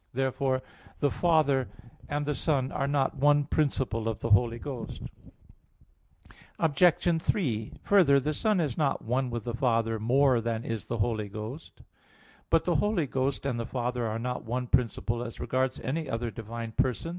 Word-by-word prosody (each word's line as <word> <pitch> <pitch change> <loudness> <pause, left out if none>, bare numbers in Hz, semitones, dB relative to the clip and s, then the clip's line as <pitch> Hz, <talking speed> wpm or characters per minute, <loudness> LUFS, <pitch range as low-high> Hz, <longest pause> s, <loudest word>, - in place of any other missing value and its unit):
Therefore 130 0 0 0.4
the 145 - +2
Father 150 - +2 0.4
and 145 0 -1
the 150 - 0
Son 135 -2 0
are 140 - -1
not 140 -1 0
one 145 +1 +4
principle 130 -6 0
of 110 - -3
the - - -3
Holy 115 +3 +4
Ghost. 130 -2 -6 1.5
Obj. 165 +1 +3
3: 115 - -1
Further, 170 -9 +5
the 150 +3 -1
Son 210 +6 +1
is 145 -8 0
not 145 -3 +1
one 125 +3 0
with 120 -2 -4
the 120 - -4
Father 115 -2 +1
more 125 +2 +3
than 115 0 -2
is 115 -3 -3
the 120 - -3
Holy 110 -1 -1
Ghost. 110 +9 -8 0.7
But - - +3
the - - +2
Holy 205 -6 +1
Ghost 135 +1 -1
and 125 -4 -1
the 115 - -2
Father 125 -1 -2
are 110 0 -2
not 125 +2 -3
one 125 +2 -2
principle 120 -1 0
as 115 -2 -8
regards 130 0 -1
any 150 +2 -3
other 115 -1 -2
divine 115 0 -6
person. 130 +7 0
130 Hz, 170 wpm, -28 LUFS, 115-145 Hz, 1.5 s, Further